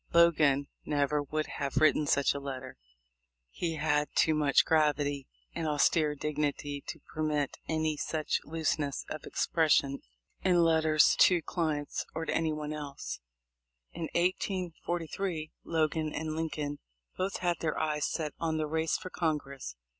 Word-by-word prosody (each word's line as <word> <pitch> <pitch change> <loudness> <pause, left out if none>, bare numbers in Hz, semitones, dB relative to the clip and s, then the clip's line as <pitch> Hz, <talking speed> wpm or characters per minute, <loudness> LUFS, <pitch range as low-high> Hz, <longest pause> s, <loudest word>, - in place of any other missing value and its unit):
Logan 150 -5 +5 0.2
never 145 0 +1
would 155 +2 -2
have 140 -2 -4
written 155 -1 +4
such 140 0 +3
a 140 - -4
letter. 130 -2 -6 0.8
He 165 -2 -2
had 150 -1 +1
too 160 - +4
much 150 -3 +4
gravity 145 -3 +2 0.3
and 165 -2 -2
austere 150 0 +3
dignity 145 -1 -2
to 160 - -5
permit 150 -2 -1
any 155 -1 0
such 155 +1 -1
looseness 155 -2 -1
of 155 - -5
expression 145 -4 +2 0.4
in 180 -2 +4
letters 160 -1 +4
to 180 - +7
his 170 - -1
clients 155 -4 -1
or 160 0 -2
to - - -1
anyone 155 -2 -1
else. 145 -2 -6 0.7
In 165 -1 -5
1843, 175 -2 -1
Logan 155 -1 0
and 155 0 -3
Lincoln 155 -3 -3 0.4
both 190 +2 -1
had 175 -2 0
their 160 -2 -1
eyes 150 -1 0
set 155 -3 -3
on 160 -1 0
the 155 - 0
race 160 +1 0
for 185 - -8
Congress. 140 - -2
155 Hz, 140 wpm, -31 LUFS, 145-160 Hz, 0.8 s, to